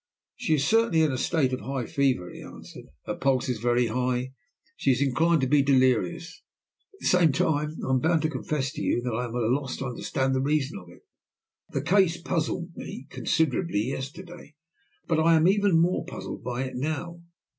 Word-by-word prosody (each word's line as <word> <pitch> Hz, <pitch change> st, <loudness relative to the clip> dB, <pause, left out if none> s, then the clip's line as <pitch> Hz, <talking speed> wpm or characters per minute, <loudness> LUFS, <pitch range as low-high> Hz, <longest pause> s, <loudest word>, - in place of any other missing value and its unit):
"She 155 Hz, -, +1 dB
is 140 Hz, -2 st, 0 dB
certainly 225 Hz, -4 st, +3 dB
in 155 Hz, -, +2 dB
a 130 Hz, -, -2 dB
state 140 Hz, -6 st, +1 dB
of 130 Hz, -, -2 dB
high 135 Hz, -3 st, -3 dB
fever," 130 Hz, -11 st, 0 dB
he -, -, -10 dB
answered. -, -, -11 dB, 0.2 s
"Her -, -, -2 dB
pulse 130 Hz, -2 st, 0 dB
is 125 Hz, -4 st, -2 dB
very 120 Hz, +1 st, +2 dB
high, 125 Hz, +2 st, 0 dB
and 125 Hz, +1 st, -4 dB, 0.5 s
she 135 Hz, -, +2 dB
is 125 Hz, -, -2 dB
inclined 155 Hz, +4 st, +2 dB
to 130 Hz, -, +1 dB
be 145 Hz, +2 st, +4 dB
delirious. 140 Hz, +5 st, +1 dB, 0.5 s
At -, -, -24 dB
the -, -, -7 dB
same 175 Hz, -4 st, +4 dB
time 150 Hz, +2 st, 0 dB
I -, -, -4 dB
am 130 Hz, -, +3 dB
bound 160 Hz, +3 st, +1 dB
to 155 Hz, -, +1 dB
confess 135 Hz, 0 st, -2 dB
to -, -, -7 dB
you 120 Hz, -, 0 dB
that 125 Hz, -2 st, -2 dB
I 125 Hz, +3 st, -1 dB
am 120 Hz, 0 st, -7 dB
at 120 Hz, -, 0 dB
a 115 Hz, +3 st, +2 dB
loss 135 Hz, -2 st, -4 dB
to 135 Hz, -, -4 dB
understand 130 Hz, +1 st, -1 dB
the 130 Hz, -, +1 dB
reason 145 Hz, -4 st, 0 dB
of 90 Hz, -2 st, -15 dB
it. 85 Hz, -, -17 dB, 0.7 s
The 135 Hz, -, -3 dB
case 180 Hz, 0 st, +3 dB
puzzled 170 Hz, 0 st, -2 dB
me 135 Hz, -, -8 dB
considerably 130 Hz, -, 0 dB
yesterday, 150 Hz, +4 st, -8 dB, 0.5 s
but 160 Hz, -2 st, +1 dB
I 165 Hz, +1 st, +5 dB
am 160 Hz, +1 st, +4 dB
even 200 Hz, -3 st, +3 dB
more 175 Hz, +2 st, +2 dB
puzzled -, -, -7 dB
by 125 Hz, +1 st, -2 dB
it 130 Hz, -, -6 dB
now. 160 Hz, +5 st, -4 dB
140 Hz, 210 wpm, -26 LUFS, 130-165 Hz, 0.7 s, I